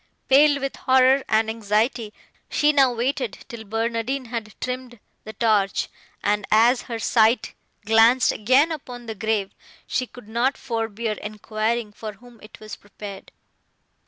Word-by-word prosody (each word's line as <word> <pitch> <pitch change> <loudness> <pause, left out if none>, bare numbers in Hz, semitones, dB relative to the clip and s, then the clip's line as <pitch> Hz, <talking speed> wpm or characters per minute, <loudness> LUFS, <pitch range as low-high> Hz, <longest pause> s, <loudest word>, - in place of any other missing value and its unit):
Pale 285 +1 +5
with 275 0 -4
horror 260 +1 +4
and 220 0 +3
anxiety, 220 +1 -1 0.4
she 300 0 +2
now 270 -3 +4
waited 245 -1 -2
till 235 -4 -8
Barnardine 230 +4 -2
had 225 -3 -5
trimmed 250 -2 -5 0.3
the 220 - -8
torch, 210 -3 +1 0.3
and, 205 0 +1
as 235 +4 +4
her 230 - -3
sight 225 0 +2 0.3
glanced 225 +3 +5
again 260 +9 +3
upon 250 -6 -7
the 225 - -5
grave, 215 -1 -2 0.3
she 255 - -2
could 245 -3 -14
not 235 +5 0
forbear 225 -2 -3
enquiring, 215 +1 -3
for 215 0 -7
whom 240 +2 -18
it 215 - -14
was 215 0 -8
prepared. 205 -1 -11
230 Hz, 140 wpm, -23 LUFS, 215-255 Hz, 0.4 s, Pale